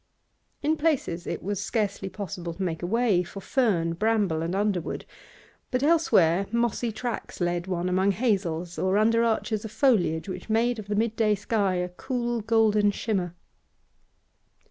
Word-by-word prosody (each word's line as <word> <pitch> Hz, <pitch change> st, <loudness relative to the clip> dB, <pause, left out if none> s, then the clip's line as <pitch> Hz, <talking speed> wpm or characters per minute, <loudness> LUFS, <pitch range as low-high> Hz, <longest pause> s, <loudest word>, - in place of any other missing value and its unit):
In 315 Hz, +2 st, +2 dB
places 280 Hz, -, 0 dB
it -, -, -4 dB
was 200 Hz, +1 st, -2 dB
scarcely 200 Hz, -2 st, -1 dB
possible 175 Hz, -4 st, -6 dB
to 190 Hz, -, -3 dB
make 165 Hz, -3 st, -2 dB
a 175 Hz, -, -2 dB
way 225 Hz, -3 st, +2 dB
for 185 Hz, +2 st, -8 dB
fern, 195 Hz, -9 st, +1 dB
bramble, 205 Hz, -4 st, +1 dB
and 170 Hz, +3 st, -2 dB
underwood, 200 Hz, -4 st, -1 dB, 0.6 s
but 255 Hz, +1 st, -1 dB
elsewhere 200 Hz, -, +3 dB
mossy 235 Hz, 0 st, 0 dB
tracks 240 Hz, +2 st, -5 dB
led 175 Hz, 0 st, -1 dB
one 180 Hz, -1 st, -1 dB
among 190 Hz, +2 st, +2 dB
hazels 180 Hz, -6 st, -1 dB
or 190 Hz, +1 st, +2 dB
under 230 Hz, +2 st, +3 dB
arches 220 Hz, -2 st, 0 dB
of 220 Hz, -, -5 dB
foliage 205 Hz, -, +2 dB
which 185 Hz, +2 st, -7 dB
made 230 Hz, +1 st, +2 dB
of 205 Hz, -, -8 dB
the 205 Hz, -, -1 dB
mid 225 Hz, +1 st, 0 dB
day 215 Hz, -2 st, +3 dB
sky 200 Hz, -2 st, 0 dB
a 180 Hz, 0 st, -1 dB
cool, 240 Hz, +5 st, -3 dB
golden 215 Hz, -1 st, +3 dB
shimmer. 190 Hz, -4 st, -2 dB
205 Hz, 160 wpm, -26 LUFS, 180-230 Hz, 0.6 s, elsewhere